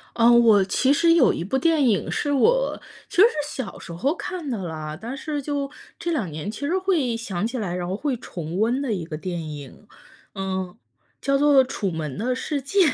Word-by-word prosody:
嗯， 235 0 +6
我 210 -4 +6
其 260 +7 +2
实 335 +3 +5
有 325 -7 +5
一 - - -3
部 205 +9 -1
电 305 -2 +3
影 205 -4 +1
是 290 - -1
我 - - +2 0.3
其 - - -10
实 - - +11
是 475 - -4 0.2
小 255 -6 -5
时 170 - -9
候 275 - 0
看 350 -4 -5
的 240 - -1
啦， 155 -2 -5
但 235 +6 -5
是 295 +1 -3
就 280 0 -2 0.3
这 340 - -2
两 240 - -1
年 155 +6 -5
其 220 - -7
实 340 +6 +1
会 340 -11 +1
想 205 -5 -3
起 240 +3 -3
来， 190 -6 -2
然 175 -1 -3
后 185 - -2
会 275 +4 -1
重 170 -7 -6
温 235 +5 +2
的 270 -4 -2
一 180 -5 -3
个 160 - -6
电 170 -2 -4
影。 145 +7 -10 0.5
嗯， 190 -1 -3 0.5
叫 275 0 +2
做 280 -2 +6
《楚 195 -6 -2
门 155 -5 -4
的 250 +3 0
世 285 +2 -2
界》。 335 +10 -1
235 Hz, 230 characters per minute, -24 LUFS, 180-285 Hz, 0.5 s, 实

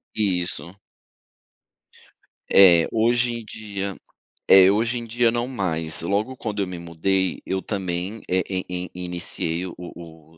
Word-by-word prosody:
Isso. 90 -3 -1 1.8
Eh, 85 -4 +7
hoje 120 +2 +2
em 115 -1 -6
dia 100 -3 -5 0.6
é, 95 0 +9
hoje 115 +4 +1
em 120 - -6
dia 115 +1 +2
não 120 +1 -1
mais, 80 -10 -1
logo 105 +8 -1
quando 105 -4 -3
eu - - -1
me 90 -1 -6
mudei, 90 +3 -1
eu 95 0 -1
também 95 +1 -3
eh, 95 0 +2
e 95 -1 -2
e 90 -1 -5
e 90 0 -6
iniciei 85 0 -3
o 90 - -8
o 80 -2 -12
95 Hz, 145 wpm, -23 LUFS, 90-110 Hz, 1.8 s, é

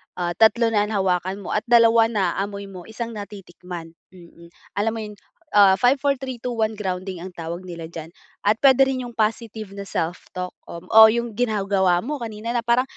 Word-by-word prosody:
ah, 175 -1 -2
tatlo 225 +1 +4
na 210 -1 +2
nahawakan 190 -2 -1
mo - - -6
at 210 - -1
dalawa 230 -1 +5
na 200 -6 0
naamoy 200 0 -5
mo, 180 -2 -10
isang 230 +1 -6
natitikman. 180 -5 -9 0.2
Mm. 170 -1 -15 0.3
Alam 220 +2 +1
mo - - -4
'yon, 210 -1 -9 0.4
ah, 200 -2 +7
five, 250 +2 +4
four, 285 0 +2
three, 260 -1 -5
two, 250 - -2
one 220 -1 0
grounding 185 -2 -4
ang 185 - -7
tawag 170 +2 -6
nila 170 -3 -8
diyan 165 -1 -8 0.3
at 210 +1 +3
puwede 270 -1 +6
rin 260 -1 -2
'yong 240 - -12
positive 220 -1 -2
na 200 0 -7
self-talk 180 +2 -4 0.2
o 200 +6 +6
'yong 235 -1 -2
ginagawa 195 -6 +2
mo 290 +4 -4
kanina 225 -1 -5
na - - +2
parang, 240 +1 +3
210 Hz, 190 wpm, -22 LUFS, 185-230 Hz, 0.4 s, ah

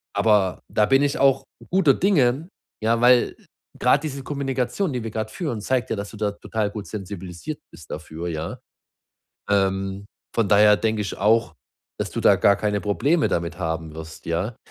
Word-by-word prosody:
aber, 105 -4 +2
da 105 - +3
bin 135 +5 +4
ich 145 -1 +1
auch 135 -1 +4 0.3
guter 175 -7 +5
Dinge, 150 -6 +2 0.4
ja? 115 +1 +2
Weil 125 0 +5 0.4
grad 130 +4 +3
diese 140 -3 -4
Kommunikation, 135 +4 -2
die 125 -2 -3
wir 115 - -5
gerade 110 0 -3
führen, 135 - -3
zeigt 125 +2 0
ja, - - 0
dass 100 -1 -6
du 110 - -10
da 105 -1 0
total 105 +1 -3
gut 105 -1 -6
sensibilisiert 95 - -6
bist 80 -4 -14
dafür, 80 +2 -6
ja? 80 -2 -4 0.9
Ähm, 95 0 0 0.3
von 115 -4 +1
daher 105 +1 +6
denke 110 0 0
ich 100 - -5
auch, 110 +3 +2 0.4
dass - - -3
du - - -3
da - - +6
gar 100 - +4
keine 105 0 -1
Probleme 140 - +1
damit 85 +1 -2
haben 80 -3 -3
wirst, 80 0 -10
ja? 90 +8 -2
105 Hz, 175 wpm, -23 LUFS, 95-130 Hz, 0.9 s, daher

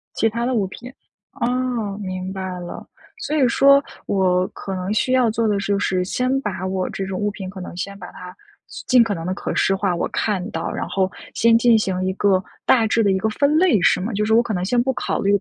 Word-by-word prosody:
其 225 - +2
他 235 +2 -2
的 255 - 0
物 210 -5 +1
品。 245 +6 -10 0.4
哦， 240 -4 -2
明 185 0 -5
白 185 -2 -5
了。 175 - -8 0.3
所 425 -9 -3
以 275 -4 +4
说 275 +3 +5 0.2
我 185 -2 +2
可 195 - -7
能 185 +3 -3
需 235 +4 0
要 250 -3 +4
做 225 +1 0
的 205 -1 +1
就 200 0 0
是， 185 -2 0
先 255 +7 -1
把 190 -5 -4
我 185 -1 -2
这 195 - -4
种 190 -1 -4
物 205 0 0
品 190 -2 -7
可 190 0 -9
能 180 - -8
先 200 +2 -5
把 180 - -8
它 180 0 -11 0.5
尽 250 -2 +6
可 225 - -2
能 165 -3 -5
地 185 - -1
可 - - -4
视 195 - +2
化， 190 -2 0
我 - - -1
看 195 -4 -1
到， 165 0 -3
然 - - -4
后 190 -1 0 0.2
先 230 0 +4
进 235 -1 +5
行 190 -3 -1
一 190 - 0
个 190 -1 +2 0.2
大 230 -4 +4
致 225 +1 +2
的 200 - +3
一 190 - +2
个 220 +3 0
分 285 +7 +2
类， 340 - +4
是 - - +4
吗？ 215 - -3
就 210 +1 0
是 220 - +1
我 230 - +6
可 235 -2 -3
能 180 -2 -2
先 240 +4 +2
不 265 +1 0
考 - - -2
虑 200 +1 +3
205 Hz, 265 characters per minute, -21 LUFS, 185-235 Hz, 0.5 s, 尽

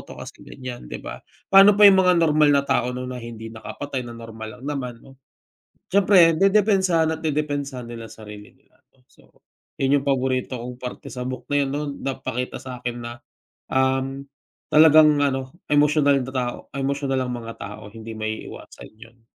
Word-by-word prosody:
'to - - -12
kasi - - -10
ganyan, 125 - -8
di - - -5
ba? - - -9 0.3
Pa'no 195 +1 +8
pa 210 - +6
yung 195 -2 +8
mga 180 -1 +4
normal 155 -1 +4
na 140 -1 +3
tao 125 - +1
'no 125 - -5
na 125 -1 -6
hindi 115 -1 -9
nakapatay, 135 +4 -6
na 120 -1 -8
normal 110 -1 -9
lang 130 - -12
naman 135 -5 -4
'no. 135 0 -17 0.7
Siyempre 185 -4 +5
dedepensahan 190 -4 +3
at - - -13
dedepensahan 145 -4 -2
nila 115 -1 -9
sarili 105 -1 -12
nila - - -33
'no. 135 - -36
So, - - -25 0.5
yun 135 +1 +3
yung - - -12
paborito 130 -2 -1
kong 125 +1 -7
parte 125 0 -8
sa 125 - -6
book 130 +1 -6
na 145 - -2
yun 135 - -3
'no. 145 +1 -3
Napakita 130 -2 -4
sa'kin 120 -2 -6
na, 120 0 -8 0.5
um, 130 +1 0 0.5
talagang 155 -1 +6
ano, 135 +2 -3
emosyonal 145 -1 +3
na 130 - -6
tao 125 -2 -2 0.2
emosyonal 135 -1 -1
ang 125 - -4
mga 115 -1 -7
tao 105 +2 -8
hindi 115 +1 -9
maiiwasan 110 0 -7
yun. 115 +1 -17
130 Hz, 175 wpm, -23 LUFS, 120-150 Hz, 0.7 s, Pa'no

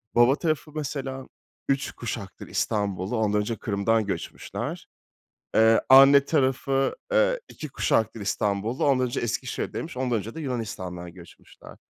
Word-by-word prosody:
baba 120 +3 +6
tarafı 155 -2 -2
mesela 135 -3 -4 0.4
3 140 0 0
kuşaktır 110 -4 -7
İstanbullu, 100 +1 -1
ondan 105 -1 +1
önce 115 +2 -2
Kırım'dan 110 +1 0
göçmüşler. 100 - -5 0.7
Eee, 110 0 +5
anne 135 +1 +8
tarafı, 135 -2 +1 0.2
eee, - - +3
2 155 - -8
kuşaktır 110 -4 0
İstanbullu, 100 +3 -1
ondan 130 -2 +3
önce 120 - -3
Eskişehir'deymiş, 130 +6 -3
ondan 125 -2 0
önce 110 +3 -7
de 160 - -6
Yunanistan'dan 95 - -5
göçmüşler. 85 -2 -15
120 Hz, 125 wpm, -26 LUFS, 105-135 Hz, 0.7 s, anne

